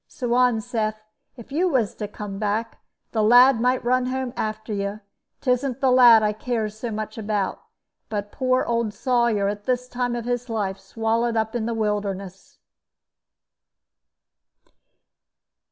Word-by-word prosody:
Suan 245 Hz, -2 st, +1 dB
saith, 215 Hz, -2 st, -2 dB, 0.4 s
if 235 Hz, +2 st, -12 dB
you 350 Hz, +6 st, +1 dB
was 245 Hz, -, +1 dB
to 210 Hz, -, -5 dB
come 200 Hz, -1 st, -7 dB
back, 215 Hz, +2 st, -2 dB, 0.3 s
the 220 Hz, -, 0 dB
lad 245 Hz, +2 st, +6 dB
might 250 Hz, 0 st, +1 dB
run 250 Hz, +1 st, +2 dB
home 260 Hz, -1 st, -3 dB
after 215 Hz, 0 st, -3 dB
you. 200 Hz, +1 st, -3 dB, 0.4 s
'Tisn't 255 Hz, 0 st, 0 dB
the 265 Hz, -2 st, +3 dB
lad 240 Hz, -3 st, +7 dB
I 210 Hz, 0 st, +1 dB
cares 220 Hz, -1 st, -2 dB
about 215 Hz, -2 st, -3 dB
so 225 Hz, -, -7 dB
much, 205 Hz, -2 st, -1 dB, 0.5 s
but 205 Hz, -1 st, -4 dB
poor 255 Hz, -1 st, +1 dB
old 230 Hz, -3 st, -1 dB
Sawyer, 235 Hz, -4 st, +1 dB
at 205 Hz, 0 st, -4 dB
his 250 Hz, 0 st, 0 dB
time 245 Hz, -1 st, -2 dB
of 235 Hz, -1 st, -4 dB, 0.2 s
life, 200 Hz, -4 st, -2 dB
swallowed 225 Hz, +3 st, -1 dB
up 220 Hz, +1 st, -1 dB
in 225 Hz, -2 st, -1 dB
the 235 Hz, -, -2 dB
wilderness." 200 Hz, -3 st, -3 dB
225 Hz, 140 wpm, -23 LUFS, 210-250 Hz, 0.5 s, lad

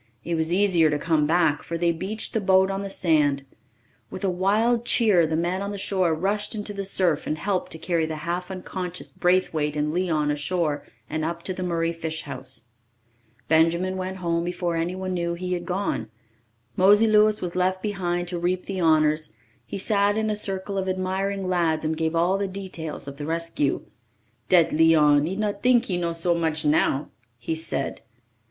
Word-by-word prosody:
It 170 Hz, -, -3 dB
was 160 Hz, 0 st, 0 dB
easier 180 Hz, -4 st, +4 dB
to 150 Hz, -, 0 dB
come 155 Hz, -1 st, +1 dB
back, 160 Hz, -2 st, +2 dB
for 170 Hz, -, -4 dB
they 170 Hz, 0 st, +2 dB
beached 195 Hz, +7 st, -3 dB
the 220 Hz, -, 0 dB
boat 190 Hz, 0 st, +4 dB
on 195 Hz, 0 st, -3 dB
the 200 Hz, -, -5 dB
sand. 150 Hz, -7 st, +2 dB, 0.6 s
With 185 Hz, -, -8 dB
a 190 Hz, -, +2 dB
wild 215 Hz, +6 st, +2 dB
cheer 210 Hz, -9 st, +4 dB
the 160 Hz, -, -1 dB
men 175 Hz, +3 st, -1 dB
on 200 Hz, -, -3 dB
the 205 Hz, -, -5 dB
shore 190 Hz, -4 st, +1 dB
rushed 205 Hz, +6 st, -1 dB
into 205 Hz, 0 st, -4 dB
the 200 Hz, -1 st, -4 dB
surf 180 Hz, -5 st, +1 dB
and 155 Hz, -, -1 dB
helped 190 Hz, +3 st, -2 dB
to -, -, -7 dB
carry 165 Hz, -1 st, 0 dB
the 160 Hz, -, -4 dB
half 175 Hz, +2 st, -3 dB
unconscious 180 Hz, -1 st, -6 dB
Braithwaite 170 Hz, -5 st, +1 dB
and 150 Hz, +1 st, -1 dB
Leon 160 Hz, -5 st, 0 dB
ashore 150 Hz, 0 st, -1 dB, 0.2 s
and 155 Hz, 0 st, -3 dB
up 170 Hz, +1 st, -3 dB
to 190 Hz, -, -2 dB
the 185 Hz, -, -6 dB
Murray 170 Hz, -2 st, -1 dB
fish 160 Hz, -1 st, -4 dB
house. 130 Hz, -2 st, -5 dB, 0.8 s
Benjamin 170 Hz, +4 st, +2 dB
went 190 Hz, 0 st, -4 dB
home 170 Hz, -2 st, -1 dB
before 175 Hz, -1 st, -2 dB
anyone 185 Hz, +3 st, -2 dB
knew 170 Hz, -1 st, -1 dB
he 180 Hz, +1 st, -3 dB
had 175 Hz, -1 st, -4 dB
gone. 180 Hz, -, -2 dB, 0.7 s
Mosey 205 Hz, +4 st, +5 dB
Louis 215 Hz, -1 st, +4 dB
was 175 Hz, -1 st, -5 dB
left 185 Hz, +1 st, 0 dB
behind 175 Hz, -4 st, -2 dB
to 175 Hz, -1 st, -3 dB
reap 180 Hz, +1 st, -1 dB
the 190 Hz, -2 st, -3 dB
honours; 155 Hz, -1 st, +2 dB, 0.3 s
he -, -, -5 dB
sat 205 Hz, +1 st, +2 dB
in 220 Hz, 0 st, 0 dB
a -, -, -1 dB
circle 195 Hz, -1 st, -1 dB
of 190 Hz, 0 st, -2 dB
admiring 190 Hz, +1 st, -2 dB
lads 165 Hz, -3 st, +1 dB
and 160 Hz, +1 st, 0 dB
gave 160 Hz, +1 st, -1 dB
all 175 Hz, +4 st, +2 dB
the 200 Hz, -, -1 dB
details 185 Hz, -7 st, -6 dB
of 140 Hz, 0 st, -8 dB
the 145 Hz, -, -5 dB
rescue. 165 Hz, -3 st, -1 dB, 0.6 s
"Dat 175 Hz, -3 st, +5 dB
Leon, 150 Hz, -2 st, +4 dB
he 185 Hz, -, -3 dB
not 205 Hz, -1 st, -2 dB
tink 250 Hz, -1 st, +4 dB
he 185 Hz, -, -2 dB
know 170 Hz, -1 st, -1 dB
so 165 Hz, +1 st, +2 dB
much 160 Hz, -2 st, -1 dB
now!" 150 Hz, -2 st, +2 dB, 0.3 s
he 140 Hz, -, -3 dB
said. 160 Hz, +1 st, -3 dB
175 Hz, 190 wpm, -24 LUFS, 160-190 Hz, 0.8 s, Mosey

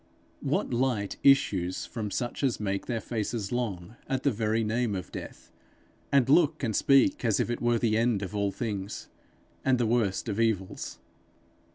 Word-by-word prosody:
What -, -, -1 dB
light 120 Hz, -5 st, 0 dB
issues 100 Hz, -10 st, +3 dB
from 110 Hz, -3 st, -4 dB
such 120 Hz, +6 st, -3 dB
as 130 Hz, -4 st, +1 dB
make 100 Hz, -2 st, -2 dB
their 120 Hz, -2 st, -1 dB
faces 110 Hz, -2 st, -3 dB
long 110 Hz, -4 st, -3 dB
at 130 Hz, -1 st, -1 dB
the 140 Hz, -, +3 dB
very 110 Hz, 0 st, 0 dB
name 110 Hz, 0 st, 0 dB
of 90 Hz, -, -6 dB
death, -, -, -9 dB, 0.6 s
and 135 Hz, -3 st, +4 dB
look 155 Hz, +1 st, +3 dB
and 110 Hz, -4 st, 0 dB
speak 135 Hz, +3 st, +4 dB
as 115 Hz, -4 st, +2 dB
if -, -, 0 dB
it 120 Hz, -, -3 dB
were 120 Hz, 0 st, +2 dB
the 110 Hz, -1 st, +1 dB
end 115 Hz, -3 st, +1 dB
of 100 Hz, +2 st, -5 dB
all 100 Hz, -1 st, 0 dB
things 100 Hz, -3 st, -5 dB, 0.5 s
and 130 Hz, -1 st, +3 dB
the 120 Hz, -, +1 dB
worst 110 Hz, -4 st, 0 dB
of 105 Hz, -, -2 dB
evils? 110 Hz, -5 st, -1 dB
115 Hz, 175 wpm, -28 LUFS, 100-125 Hz, 0.6 s, and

